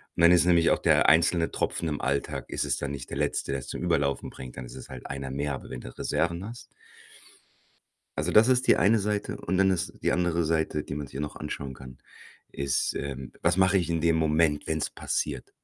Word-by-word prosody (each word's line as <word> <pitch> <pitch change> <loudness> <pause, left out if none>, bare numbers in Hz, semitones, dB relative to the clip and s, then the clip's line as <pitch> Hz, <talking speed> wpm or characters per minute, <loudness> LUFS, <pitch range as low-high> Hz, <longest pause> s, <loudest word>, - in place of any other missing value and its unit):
Und - - -1
dann 85 - +8
ist 90 -1 +5
nämlich 85 -2 +4
auch - - +2
der - - +4
einzelne 85 0 +4
Tropfen 85 - -2
im 75 -2 -3
Alltag 70 +1 -2
ist - - -1
es - - 0
dann 70 - -3
nicht 70 -3 -7
der - - -5
letzte, - - -1
der 70 - -1
es 65 - -10
zum - - -5
Überlaufen 70 -1 0
bringt. 65 -2 -10
Dann 65 - -6
ist - - -11
es 65 - -10
halt 65 -2 -9
einer 70 -1 -5
mehr. 70 +1 -2
Aber 65 - -7
wenn 60 - -6
du - - -11
Reserven 85 +2 -1
hast 115 +2 -9 1.5
Also, - - 0
das 110 +2 +6
ist 130 0 +3
die - - +6
eine 105 +6 +4
Seite 105 0 -2
und 95 +1 -2
dann 95 0 +5
ist 90 -3 -1
die - - +1
andere 85 -1 +1
Seite, 80 -1 0
die 75 - -6
man 75 0 -4
sich - - -16
hier 70 - -4
noch 75 - -5
anschauen 70 -3 -5
kann, 65 0 -12 0.5
ist, 70 -3 -1
ähm: 65 -2 -5
„Was 85 +2 +3
mache 95 +1 +4
ich 85 -3 -1
in 80 -1 0
dem 85 0 +3
Moment, 80 -1 +2
wenn's 80 -1 -1
passiert?“ 70 -4 -3
80 Hz, 235 wpm, -27 LUFS, 70-85 Hz, 1.5 s, dann